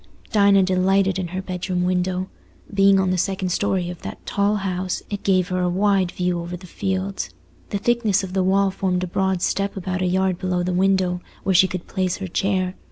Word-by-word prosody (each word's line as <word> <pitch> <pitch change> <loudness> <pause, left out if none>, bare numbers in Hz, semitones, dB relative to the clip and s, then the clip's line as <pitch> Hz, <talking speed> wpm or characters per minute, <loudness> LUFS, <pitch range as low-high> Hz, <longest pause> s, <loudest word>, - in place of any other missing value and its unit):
Dinah 200 -2 +5
delighted 190 +1 +2
in 180 - -2
her 185 +2 -5
bedroom 180 -1 -2
window. 180 +1 0 0.5
Being 195 0 +5
on 190 -1 +1
the 185 - 0
second 190 0 -1
story 185 -1 0
of 175 - -10
that - - -8
tall 200 +1 +1
house, 185 -2 -2
it 205 - -3
gave 185 -2 +2
her 185 0 0
a 180 - +1
wide 195 0 +2
view 180 -1 -1
over 175 +1 -5
the 185 - -13
fields. 190 +2 -3 0.4
The 205 - -1
thickness 215 -2 +1
of 185 -1 -6
the 190 - +2
wall 195 +1 +3
formed 185 -1 -1
a - - -2
broad 190 0 0
step 200 0 -1
about 185 0 -3
a 185 - +1
yard 185 0 +1
below 180 -1 -1
the 180 0 -1
window, 185 -1 +2 0.2
where 190 - +1
she 185 +1 +6
could 185 -2 -5
place 185 -2 -1
her 195 - -5
chair. 185 0 0
185 Hz, 210 wpm, -22 LUFS, 180-195 Hz, 0.5 s, she